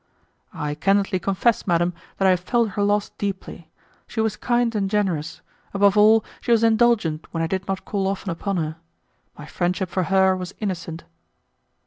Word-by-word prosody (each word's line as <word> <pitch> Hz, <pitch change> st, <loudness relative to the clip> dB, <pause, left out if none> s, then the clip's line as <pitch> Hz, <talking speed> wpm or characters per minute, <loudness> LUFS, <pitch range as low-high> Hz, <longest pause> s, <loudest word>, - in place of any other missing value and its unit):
"I 150 Hz, 0 st, -3 dB
candidly 195 Hz, +4 st, +1 dB
confess, 195 Hz, +6 st, +1 dB
madam, 175 Hz, 0 st, +2 dB, 0.2 s
that 195 Hz, -, +1 dB
I -, -, +6 dB
have 180 Hz, -, +2 dB
felt 230 Hz, +5 st, +1 dB
her 205 Hz, -, -2 dB
loss 205 Hz, 0 st, +1 dB
deeply. 190 Hz, -4 st, -5 dB, 0.4 s
She 225 Hz, -, -6 dB
was 220 Hz, -1 st, +1 dB
kind 240 Hz, 0 st, 0 dB
and 200 Hz, -3 st, -1 dB
generous; 180 Hz, -7 st, -1 dB, 0.3 s
above 200 Hz, 0 st, +4 dB
all, 215 Hz, +1 st, +5 dB, 0.2 s
she -, -, -7 dB
was 230 Hz, -1 st, +4 dB
indulgent 220 Hz, -9 st, +2 dB
when 165 Hz, -1 st, -2 dB
I -, -, +1 dB
did 190 Hz, +3 st, -3 dB
not 195 Hz, -1 st, -3 dB
call 195 Hz, -2 st, -1 dB
often 195 Hz, -1 st, -3 dB
upon 195 Hz, +3 st, -3 dB
her. 160 Hz, -1 st, -3 dB, 0.6 s
My 150 Hz, -, -9 dB
friendship 180 Hz, +3 st, -2 dB
for 185 Hz, -1 st, 0 dB
her 190 Hz, +1 st, +3 dB
was 185 Hz, 0 st, -6 dB
innocent." 180 Hz, -5 st, -4 dB
195 Hz, 175 wpm, -23 LUFS, 175-210 Hz, 0.6 s, I